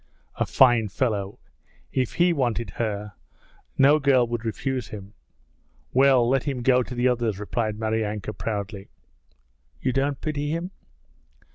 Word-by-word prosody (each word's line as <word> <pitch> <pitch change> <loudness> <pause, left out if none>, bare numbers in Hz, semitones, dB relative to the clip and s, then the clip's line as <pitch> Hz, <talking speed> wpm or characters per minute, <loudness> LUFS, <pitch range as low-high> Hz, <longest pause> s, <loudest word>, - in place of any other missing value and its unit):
'A - - +1
fine 120 -5 +4
fellow! 100 -2 -2 0.5
If 130 -3 -1
he 175 0 +3
wanted 120 - -1
her, 105 -2 -3 0.6
no 145 +3 +6
girl 135 -4 +4
would 120 -1 -4
refuse 130 +3 -3
him.' 100 -1 -9 0.8
'Well, 130 -2 +5
let 130 +1 +1
him 135 -4 -3
go 125 0 +4
to 125 0 -6
the 120 +1 +2
others,' 120 -5 0
replied 105 +1 -2
Maryanka 110 -1 -2
proudly. 100 -2 -5 0.9
'You 130 - -1
don't 140 +1 0
pity 145 -1 -3
him?' 170 +4 -3
120 Hz, 135 wpm, -25 LUFS, 110-135 Hz, 0.9 s, no